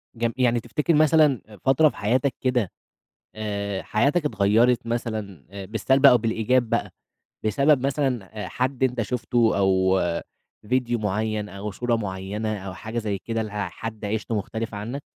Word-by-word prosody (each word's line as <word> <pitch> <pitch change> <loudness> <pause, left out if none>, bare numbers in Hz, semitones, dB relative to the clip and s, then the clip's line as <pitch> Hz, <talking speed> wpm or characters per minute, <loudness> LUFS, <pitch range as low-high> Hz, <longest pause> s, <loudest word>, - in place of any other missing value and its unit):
جم 115 0 -1
يعني 120 -2 +3
تفتكر 145 +8 -1
مثلًا 150 -3 +4
آآ 105 -2 -14
فترة 135 - +4
في - - -13
حياتك 130 +6 +1
كده 125 -7 +1 0.6
آآ 100 -2 -3
حياتك 145 +9 +1
اتغيّرت 115 +1 +3
مثلًا 110 - -4
آآ 100 -1 -7
بالسلْب 130 +6 +3
أو 125 -2 +8
بالإيجاب 115 +2 +1
بقى، - - 0 0.6
بسبب 140 +5 +3
مثلًا 130 -7 -1
آآ - - -5
حد 130 +5 -2
أنت 125 -2 +1
شُفته 120 -1 +1
أو 95 -1 +3 0.7
فيديو 120 -2 +1
معيّن 105 0 -1
أو 100 +2 -6
صورة 120 +4 0
معيّنة 105 +1 -3
أو 95 -1 -7
حاجة 110 +6 -4
زي 105 -3 -2
كده، 115 +2 -3
ل 110 - -6
آآ 105 0 -3
حد 110 -2 -7
عيشته 110 +2 -2
مختلِفة 110 +1 -4
عنك؟ 120 +8 -5
115 Hz, 160 wpm, -24 LUFS, 105-125 Hz, 0.7 s, أو